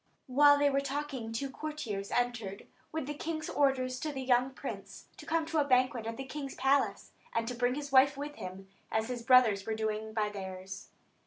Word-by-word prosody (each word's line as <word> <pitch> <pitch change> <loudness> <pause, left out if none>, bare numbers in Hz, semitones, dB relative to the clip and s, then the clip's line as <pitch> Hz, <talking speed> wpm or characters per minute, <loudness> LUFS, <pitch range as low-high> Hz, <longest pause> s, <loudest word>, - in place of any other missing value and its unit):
While 285 +2 +6
they 285 0 +3
were 275 0 +2
talking 275 -4 -4
two 265 +4 -3
courtiers 265 -10 -4
entered, 240 -5 -1 0.3
with 315 -3 -3
the 295 - -3
king's 310 +1 -4
orders 255 -3 +1
to 310 - -2
the 265 -2 -4
young 250 0 +3
prince, 265 - -7
to - - -11
come 330 0 +1
to 320 0 0
a - - +5
banquet 255 -4 +2
at 230 - -4
the 270 - -5
king's 275 0 -6
palace, 270 +2 +1 0.2
and 230 +2 -1
bring 245 +1 +2
his 290 -1 -5
wife 275 +1 +6
with 290 +1 -5
him, 185 +1 -7 0.2
as 220 +2 0
his 245 -1 -3
brothers 230 -5 +5
were 220 - 0
doing 220 0 -2
by 215 -1 0
theirs. 190 -1 -7
255 Hz, 195 wpm, -32 LUFS, 220-285 Hz, 0.3 s, While